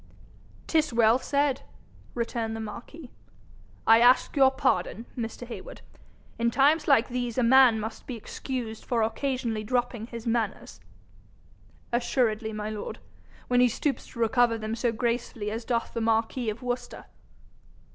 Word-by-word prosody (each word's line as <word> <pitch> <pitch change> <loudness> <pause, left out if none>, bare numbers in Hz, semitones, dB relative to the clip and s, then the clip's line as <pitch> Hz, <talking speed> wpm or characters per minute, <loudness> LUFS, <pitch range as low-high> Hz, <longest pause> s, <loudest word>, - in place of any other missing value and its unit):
''Tis 315 -3 +2
well 230 +1 +4
said,' 280 -1 0 0.5
returned 230 -1 -2
the - - -5
marquis. 240 +7 -8 0.7
'I 225 0 +7
ask 245 +2 +4
your 270 -2 +6
pardon, 265 -3 0
Mr. 235 0 -5
Heywood. 250 - -9 0.6
In 235 0 +2
times 295 +5 +3
like 260 -5 +4
these 245 -1 -3
a 255 - +3
man 245 -2 +6
must 220 +1 -6
be 255 - -4
excused 230 0 -5
for 235 -3 0
occasionally 235 -2 -2
dropping 240 -1 -1
his 235 -1 -8
manners.' 230 -3 -2 1.1
'Assuredly, 235 -2 0
my 215 0 -4
lord, 210 -1 -6 0.5
when 245 0 +3
he 250 - +6
stoops 275 +4 -2
to 235 - -12
recover 230 0 +3
them 220 0 -4
so 235 +1 0
gracefully 235 -2 -2
as 225 +1 -5
doth 235 -2 -1
the 230 - -2
marquis 225 +1 0
of 215 +3 -6
Worcester.' 245 0 -4
235 Hz, 145 wpm, -27 LUFS, 225-255 Hz, 1.1 s, I